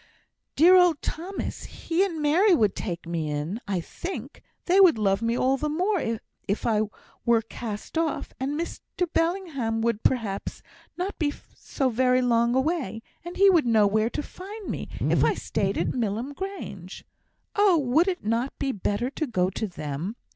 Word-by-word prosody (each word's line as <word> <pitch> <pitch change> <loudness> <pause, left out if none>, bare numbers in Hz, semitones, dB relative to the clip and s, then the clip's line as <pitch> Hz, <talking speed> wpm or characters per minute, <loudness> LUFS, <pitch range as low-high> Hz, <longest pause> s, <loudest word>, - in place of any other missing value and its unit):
"Dear 355 +5 +7
old 355 -5 +5
Thomas! 365 +5 -4
He 345 +3 -1
and 330 -6 -2
Mary 350 +6 +5
would 210 -9 +2
take 175 -4 -4
me 165 -2 -2
in, 150 +10 -3
I 195 -3 0
think; 360 - -7 0.2
they 375 +2 +5
would 355 -10 +7
love 195 -1 +1
me 230 +1 0
all 265 +2 +2
the 300 +2 -2
more 365 +3 0 0.4
if 200 +1 -1
I 215 -2 +2 0.4
were 230 -1 +3
cast 225 +6 -5
off. 325 -2 -2
And 280 +4 -2
Mr 345 +1 -3
Bellingham 330 -10 0
would, 230 -2 0
perhaps, 220 -6 -1 0.3
not 370 +3 -3
be 295 -3 +1 0.2
so 270 -2 -1
very 255 +1 +2
long 235 0 +3
away; 265 - -1 0.2
and 345 +1 -7
he 395 0 +7
would 330 -8 +3
know 220 -3 +5
where 215 +2 +2
to 295 - -4
find 400 +5 -8
me - - -5
if - - +2
I - - +3
stayed - - -1
at - - 0
Milham 235 +3 -2
Grange. 285 - -7 0.5
Oh, 405 -4 +5
would 300 +5 +3
it 365 - -2
not 230 +5 -1
be 270 - -1
better 210 +3 -2
to 310 +2 -3
go 185 -6 +1
to 215 +3 -3
them? 160 +3 -5
255 Hz, 175 wpm, -26 LUFS, 215-340 Hz, 0.5 s, Dear